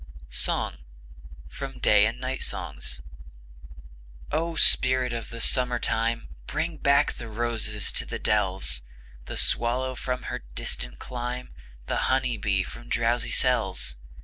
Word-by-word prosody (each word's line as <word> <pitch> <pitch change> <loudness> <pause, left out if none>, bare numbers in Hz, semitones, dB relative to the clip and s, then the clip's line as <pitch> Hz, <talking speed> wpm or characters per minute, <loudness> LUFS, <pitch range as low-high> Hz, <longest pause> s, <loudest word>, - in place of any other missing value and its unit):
From - - +1 0.7
'Ballads 115 -5 +2
and 130 +1 -2
Songs.' - - -4
SONG 65 0 -3 1.3
O 165 +1 0
spirit 130 -4 +5
of 115 -1 -4
the 115 - -7
Summer 125 +1 +4
time! 115 0 0 0.2
Bring 165 0 -2
back 140 0 +4
the 120 - -8
roses 110 -2 -1
to - - -1
the - - -3
dells; 95 -10 +1 0.4
The - - -5
swallow 130 +2 +1
from 125 0 -3
her - - -3 0.2
distant 60 +1 -3
clime, 125 - -5 0.3
The - - -1
honey 130 -3 +2
bee 95 -2 +1
from 120 +5 -10
drowsy 120 +1 +1
cells. 100 - +1
120 Hz, 125 wpm, -27 LUFS, 105-130 Hz, 1.3 s, spirit